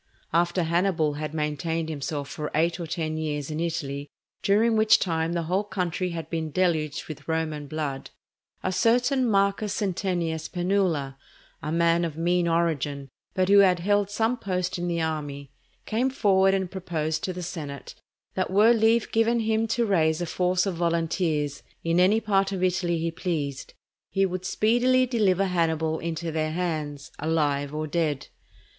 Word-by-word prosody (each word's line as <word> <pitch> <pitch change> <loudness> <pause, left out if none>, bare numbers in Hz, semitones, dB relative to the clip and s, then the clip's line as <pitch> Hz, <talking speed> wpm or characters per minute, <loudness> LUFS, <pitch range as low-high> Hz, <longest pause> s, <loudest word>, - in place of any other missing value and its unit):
After 175 +1 +2
Hannibal 165 -2 +1
had 150 +1 -4
maintained 160 +1 -2
himself 145 -2 -4
for 150 +1 -5
eight 165 +3 +1
or 170 - -4
ten 155 -1 -2
years 150 -2 -3
in 155 - -3
Italy, 145 -4 -3 0.3
during 220 +3 +3
which 220 0 +6
time 165 -2 -1
the 170 -1 -1
whole 185 +5 0
country 185 -3 -2
had 165 -2 -5
been 160 -2 -3
deluged 155 -3 0
with 155 - -9
Roman 160 -2 -2
blood, 145 -2 -4 0.5
a 185 - 0
certain 245 +5 +2
Marcus 200 0 +1
Centenius 175 -5 -2
Penula, 175 -7 0 0.4
a 150 - -3
man 170 +1 +3
of 160 -3 -3
mean 175 +1 +1
origin, 150 -5 0 0.3
but 185 -1 +2
who 200 0 +7
had 185 -2 +5
held 205 +1 +2
some 225 +4 0
post 185 -3 -2
in 175 - -2
the 170 -1 -1
army, 145 -3 -3 0.3
came 240 +4 +1
forward 195 -6 +3
and 190 -2 -2
proposed 160 -4 -2
to 185 - -2
the 180 0 -6
senate 150 -5 -6 0.4
that 185 - -1
were 210 +5 +5
leave 225 0 +2
given 230 +1 +2
him 220 0 +1
to 230 +1 +1
raise 160 -6 +2
a 175 - -1
force 180 +3 +1
of 195 - -1
volunteers 165 -3 0 0.2
in 165 +1 +2
any 195 +5 +5
part 195 -3 +1
of 190 -2 -2
Italy 175 -2 +1
he 165 +1 -1
pleased, 150 -6 -4 0.3
he 195 0 +2
would 185 0 -4
speedily 245 +6 +3
deliver 200 -6 +2
Hannibal 160 -3 0
into 165 0 -3
their 155 0 -1
hands, 155 -5 -3
alive 145 -3 0
or 155 +1 -3
dead. 150 -3 -1
170 Hz, 165 wpm, -26 LUFS, 155-195 Hz, 0.5 s, who